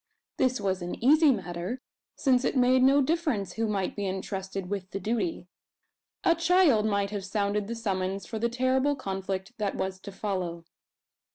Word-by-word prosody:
This 255 -2 +2
was 190 -2 -1
an 175 0 -4
easy 300 +4 +5
matter, 185 +1 -3 0.4
since 260 -3 +2
it - - 0
made 255 +1 +4
no 275 +2 +5
difference 260 - 0
who 225 +2 -1
might 200 -3 -1
be 205 -1 -2
entrusted 190 0 -4
with 195 -1 -4
the 195 - -4
duty. 200 -4 -2 0.8
A 335 - +5
child 335 - +4
might 200 -1 0
have 205 -2 -3
sounded 200 +1 -1
the 235 - -4
summons 195 -3 -2
for 220 - -5
the 235 +2 +1
terrible 260 +3 +1
conflict 195 -3 -4
that 205 -2 -1
was 190 0 -3
to 200 - -9
follow. 185 -4 -3
205 Hz, 170 wpm, -28 LUFS, 190-255 Hz, 0.8 s, easy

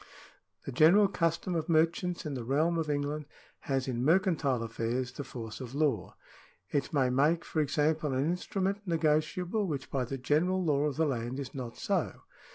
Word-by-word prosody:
The - - -4
general 170 +10 +6
custom 170 -1 -1
of 165 0 -2
merchants 165 +2 +1
in 150 - -3
the 125 -3 -4
realm 155 +7 +1
of 155 -2 -2
England 145 +1 -2 0.3
has 135 -1 -2
in 125 -2 -1
mercantile 160 - +2
affairs 115 +2 -2
the 145 - -6
force 115 -2 -7
of 130 +1 -7
law. 140 - 0 0.6
It 140 -2 -1
may 135 -5 +2
make, 150 +6 +2
for 155 - 0
example, 150 +1 +1
an 130 +2 +1
instrument 190 +4 -1
negotiable, 170 +5 +1
which 140 -5 -4
by 130 -2 0
the 135 +3 -4
general 165 +8 +1
law 145 -2 +2
of 145 -3 -1
the 160 - +2
land 125 -1 -2
is 135 -2 -6
not 125 -4 -6
so. - - -1
150 Hz, 175 wpm, -30 LUFS, 130-165 Hz, 0.6 s, general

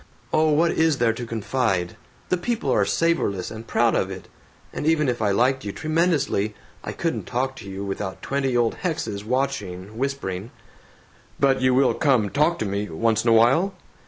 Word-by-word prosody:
"Oh, 155 0 +4
what 160 +3 +3
is 160 -3 +2
there 115 -2 +2
to 120 +1 -6
confide? 110 -5 -1 0.3
The 180 - +2
people 235 +6 -1
are - - +3
savorless 165 - 0
and 110 +1 -8
proud 115 -1 +2
of 95 - 0
it. 95 -1 -8 0.5
And 150 - -3
even 155 -2 +3
if 120 -2 -1
I 105 - +2
liked 125 +6 +2
you 100 - -3
tremendously, 155 - 0 0.3
I - - -4
couldn't - - -3
talk 130 +2 -1
to 100 - -9
you 95 +1 -5
without 95 -1 -5
twenty 135 -2 0
old 120 -1 +1
hexes 115 - -3
watching, 110 -5 -3
whispering." 120 -8 -3 0.9
"But 135 -2 +3
you 130 -1 +3
will 135 0 +4
come 125 -9 +2
talk 155 +4 +2
to - - -2
me, 100 0 -2
once 110 +6 +1
in 120 - +2
a - - +6
while?" 135 - +4
120 Hz, 185 wpm, -23 LUFS, 105-145 Hz, 0.9 s, a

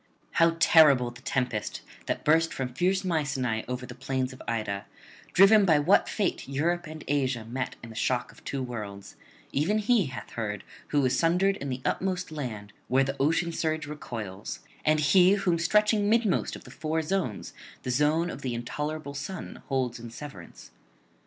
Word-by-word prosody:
How 165 0 +3
terrible 140 -8 +6
the 120 +1 -14
tempest 125 -5 -2 0.3
that - - -2
burst 165 +2 +4
from 125 -2 -4
fierce 185 +7 +1
Mycenae 135 -9 0
over 125 0 -4
the 125 - -9
plains 130 +1 -2
of 130 - -12
Ida, 105 -4 -2 0.4
driven 200 +3 +7
by 165 -6 +5
what 150 +7 +4
fate 200 -9 -1
Europe 170 +5 0
and 155 -1 -8
Asia 130 -5 0
met 125 +3 -4
in 115 - -8
the - - -12
shock 120 +2 0
of - - -19
two 135 -2 -3
worlds, 105 -5 -7 0.4
even 170 +10 +1
he 215 - +3
hath 130 -2 -8
heard 105 -3 -4 0.2
who 145 -2 +2
is 125 - +2
sundered 180 +4 +3
in 140 - -5
the 130 0 -3
utmost 185 -2 -1
land 110 -9 -6
where 130 +2 +3
the 135 +1 -3
ocean 165 +4 +2
surge 160 -2 -1
recoils, 115 -10 -6 0.2
and 155 0 +3
he 180 +6 +5
whom 185 -4 +1
stretching 210 +4 +3
midmost 225 -4 +2
of - - -11
the - - -13
four 160 +1 -2
zones 160 - -2 0.3
the 125 - -2
zone 155 +6 +2
of 140 - -8
the 125 -3 -2
intolerable 150 +5 -4
sun 145 +7 -6
holds 130 -3 -1
in 120 0 -8
severance. 115 -7 -10
145 Hz, 175 wpm, -28 LUFS, 125-170 Hz, 0.4 s, driven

